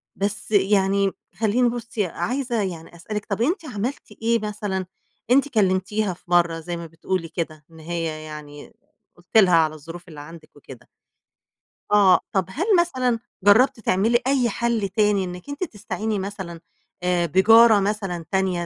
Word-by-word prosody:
بس 205 +2 -3
يعني 195 -1 +3 0.2
خلّيني 235 +3 +2
بُصّي، 235 -3 -3
عايزة 240 +7 -2
يعني 170 -4 -6
أسألِك 210 +5 -5
طب 200 +1 -3
أنتِ 330 - 0
عملتِ 245 -1 -5
إيه 230 0 +2
مثلًا؟ 205 -3 -3 0.5
أنتِ 275 +2 +5
كلّمتيها 195 -2 +1
في 175 - -19
مرّة 170 -2 +3
زي 170 +1 -5
ما 170 - -7
بتقولي 165 +2 -3
كده، 155 -3 -5
إن 160 - -15
هي 160 -1 -4
يعني 150 -1 -10 0.4
قُلتِ 175 +5 -2
لها 185 -5 +6
على 160 -2 +3
الظروف 165 +4 -11
اللي 155 -3 -11
عندِك 160 +1 -12
وكده. 135 -4 -14 1.0
آه. 195 -4 +6
طب 190 -2 +1
هل 310 - -3
مثلًا 255 -9 0 0.2
جرّبتِ 230 +5 +5
تعملي 225 +4 +2
أي 265 -3 +2
حل 230 -2 -1
تاني 205 0 +2
إنِّك 180 +5 -8
أنتِ 285 +5 -4
تستعيني 215 - -4
مثلًا 190 -3 -6 0.4
آآ 180 -1 +1
بجارة 220 +6 +6
مثلًا 195 -4 -2
تانية 190 -3 0
195 Hz, 150 wpm, -23 LUFS, 175-225 Hz, 1.0 s, لها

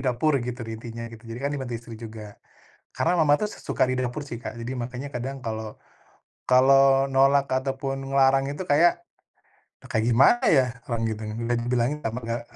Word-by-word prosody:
dapur 135 +4 +1
gitu 125 +1 -5
di 115 - -6
intinya 115 0 -7
gitu. 110 -2 -12
Jadi 115 - -6
kan 140 - 0
dibantu 130 -4 -4
istri 115 0 -12
juga. 110 -2 -10 0.5
Karena 175 +2 +1
mama 155 -3 +4
tuh 210 - 0
s - - -10
suka 130 - +1
di 130 - 0
dapur 130 +2 -2
sih, 120 - -5
Kak, 115 0 -7
jadi 120 +2 -4
makanya 125 +3 -5
kadang 135 +1 -5
kalau 110 -3 -6 0.7
kalau 135 +1 +5
nolak 135 +1 +3
atau 135 +1 -1
pun 135 -1 -2
ngelarang 135 0 +2
itu 160 +6 -5
kayak, 170 +3 +3 0.8
e - - -17
kayak 110 0 -1
gimana 135 - +5
ya? 135 -5 +5 0.2
Orang 115 -1 -1
gituin, 110 -1 -4
udah 120 +1 -1
dibilangin 125 +4 0
tambah 115 +1 -3
gak 115 +1 -2
130 Hz, 190 wpm, -25 LUFS, 115-135 Hz, 0.8 s, kalau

